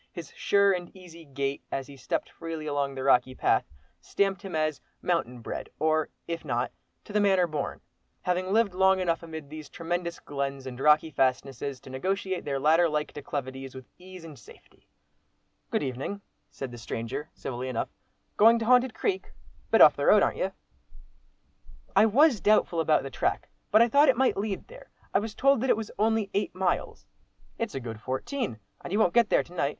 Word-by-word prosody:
His 165 -4 -9
sure 200 0 +3
and 175 -1 -4
easy 170 -3 -13
gait, 140 0 -3
as 135 - -2
he 140 - -12
stepped 130 -1 -3
freely 165 -2 -6
along 140 -2 -1
the 130 - -4
rocky 130 -1 +3
path, - - +2 0.3
stamped 195 -1 -1
him 195 -5 -6
as 155 -2 0 0.2
"mountain 125 -9 -1
bred," - - -6
or, 155 0 +1 0.2
if 170 -1 -4
not 120 0 -1 0.3
"to - - -11
the 210 - +3
manner 190 -3 +4
born," 155 -4 -4 0.4
having 180 +1 -1
lived 220 -2 +3
long 190 +1 +4
enough 170 -3 0
amid 160 -3 -8
these 155 -1 -8
tremendous 170 +1 -3
glens 140 -1 -4
and 125 -1 -7
rocky 150 +3 +4
fastnesses, 135 0 -1
to 130 - -12
negotiate 190 +6 -2
their 140 -2 -1
ladder 160 +4 +4
like 150 0 -2
declivities 135 -2 -6
with 130 -1 -9
ease 185 -1 -11
and 150 -6 -11
safety. 100 - -19 0.8
"Good - - 0
evening!" 135 +10 -4 0.3
said 135 -2 -7
the 120 - -9
stranger, 115 +6 -5
civilly 125 0 -5
enough. 120 -3 -2 0.5
"Going 225 +2 +7
to 225 - -2
'Haunted 250 0 +4
Creek?'—a 390 -2 -2 0.4
bit - - +5
off - - +9
the - - -1
road, - - +7
ar'n't - - 0
you?" - - 0 1.4
"I 220 - +6
was 255 0 +4
doubtful 205 -5 +3
about 155 -3 +3
the 135 - -6
track, - - -1 0.2
but 220 +2 +6
I - - +3
thought 285 +4 +5
it 255 - +4
might 265 0 +3
lead 200 -1 -3
there. - - -14 0.2
I - - +4
was 210 0 -5
told 275 -3 +3
that 265 - 0
it - - +4
was 220 -1 -5
only 220 -1 +1
eight 200 -1 -1
miles." 185 -1 -1 0.5
"It's 230 - -3
a - - -1
good 115 -3 -7
fourteen, 130 - -3 0.3
and - - -7
you 200 - +1
won't 200 -5 +3
get 235 -2 +4
there - - +3
to 175 - -16
night. 140 -5 0
165 Hz, 195 wpm, -27 LUFS, 135-200 Hz, 1.4 s, off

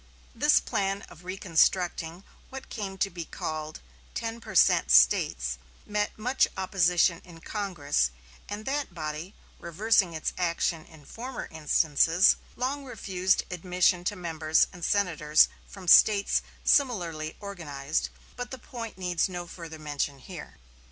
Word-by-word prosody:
This 60 - +4
plan 195 - -2
of 175 - -14
reconstructing 180 -1 0 0.3
what 265 0 -9
came 195 -4 -5
to 195 +1 0
be 170 -1 -5
called 155 -1 -5 0.3
"ten 230 0 -4
percent 70 - +3
States," - - +4 0.3
met 210 0 -2
much 250 +5 +2
opposition 180 -2 +2
in 170 -2 -14
Congress, 165 - -1 0.4
and 210 +1 -6
that 275 -8 -2
body, 155 +3 -5 0.2
reversing 185 +1 +2
its 155 - -2
action 170 -2 0
in 155 -3 -17
former 250 - -7
instances, 160 +2 +3 0.2
long 270 +3 -2
refused 190 -7 0
admission 180 0 +1
to 205 - -1
members 160 -3 +1
and 175 -2 -11
senators 160 -6 +3 0.2
from 190 -3 -11
States 200 +3 +6 0.2
similarly 170 - +1
organized; 155 -8 -3 0.3
but 245 0 -5
the 260 - -7
point 230 -3 -8
needs 180 -1 0
no 175 -1 -5
further 165 -2 -9
mention 145 -2 -3
here. 165 - -10
180 Hz, 130 wpm, -28 LUFS, 160-200 Hz, 0.4 s, States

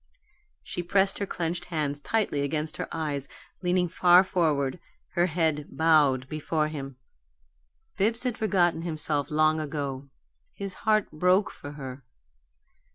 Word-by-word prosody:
She - - -4
pressed 195 +3 +1
her 200 - -2
clenched 175 0 -3
hands 150 -4 -2
tightly 200 -3 0
against 155 +2 -2
her - - -3
eyes, 145 -4 -2 0.3
leaning 180 0 +2
far 180 +1 +6
forward, 155 -5 0 0.3
her 175 0 +2
head 160 -3 0
bowed 150 -5 +3
before 155 +1 -1
him. 135 -3 -6 1.0
Bibbs 225 +5 +1
had 250 -3 -1
forgotten 180 -7 +2
himself 155 -4 -2
long 155 +1 +3
ago; 140 -3 -4 0.5
his 195 -1 -5 0.2
heart 215 -1 +3
broke 180 +6 +2
for 145 - -9
her. 135 -2 -8
160 Hz, 130 wpm, -27 LUFS, 145-180 Hz, 1.0 s, far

